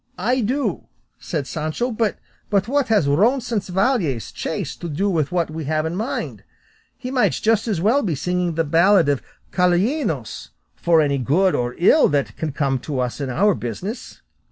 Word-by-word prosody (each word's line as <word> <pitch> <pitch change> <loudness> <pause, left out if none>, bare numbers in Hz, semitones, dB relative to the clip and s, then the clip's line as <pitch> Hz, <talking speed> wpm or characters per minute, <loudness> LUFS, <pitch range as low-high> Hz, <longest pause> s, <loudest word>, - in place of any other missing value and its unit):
"I 250 +3 +1
do," 265 +7 -1 0.3
said 150 -5 -3
Sancho, 155 - -2
"but 220 -2 -1 0.5
what 280 +1 +1
has 210 -10 +3
Roncesvalles 195 - +1
chase - - -4
to 170 - -6
do 195 +7 0
with 155 -5 0
what 170 -3 0
we 160 -1 -5
have 155 +1 0
in 170 +4 -3
hand? 225 +5 -4 0.5
He 255 - -6
might 260 -2 +2
just 220 0 +1
as 205 -7 0
well 230 +9 +3
be 175 - -1
singing 180 +3 -1
the 165 - +1
ballad 170 +3 +4
of 140 -2 +1 0.3
Calainos, 180 - 0 0.3
for 165 -2 +3
any 140 -2 +1
good 175 - +2
or 120 0 -1
ill 245 - +5
that 140 -8 -1
can 160 -2 -3
come 135 -2 0
to 140 0 -4
us 125 +3 -2
in 135 - -2
our 195 +11 +3
business." 180 - -6
175 Hz, 170 wpm, -21 LUFS, 145-215 Hz, 0.5 s, ill